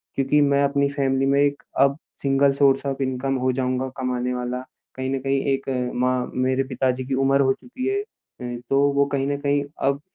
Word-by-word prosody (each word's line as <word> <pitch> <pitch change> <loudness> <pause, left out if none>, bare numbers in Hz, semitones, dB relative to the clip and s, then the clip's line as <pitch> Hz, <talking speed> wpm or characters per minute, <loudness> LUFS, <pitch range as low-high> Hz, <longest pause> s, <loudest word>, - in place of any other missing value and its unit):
क्यूँकि 140 +2 +2
मैं 140 0 +3
अपनी 140 0 +2
फैमिली 135 -1 0
में 140 +1 +3
एक 145 0 0 0.2
अब 140 +1 +4 0.2
सिंगल 140 0 +3
सोर्स 135 0 +4
ऑफ 140 0 -2
इनकम 130 +1 -1
हो 130 - +3
जाऊँगा 130 0 -1
कमाने 125 -1 -1
वाला। 125 0 -3 0.3
कहीं 130 0 -3
न - - -2
कहीं 135 0 0
एक 135 0 -3 0.3
माँ 125 0 0
मेरे 130 +1 +1
पिताजी 130 0 -1
की 135 - -3
उम्र 135 +1 +4
हो 135 -1 +3
चुकी 255 - -6
है। 400 +1 0
अ, 125 - -9
तो 135 - +3 0.2
वो 140 0 +4
कहीं 135 0 0
न 145 0 -1
कहीं 145 0 +1 0.3
अब 140 +1 -2
135 Hz, 200 wpm, -23 LUFS, 130-140 Hz, 0.3 s, अब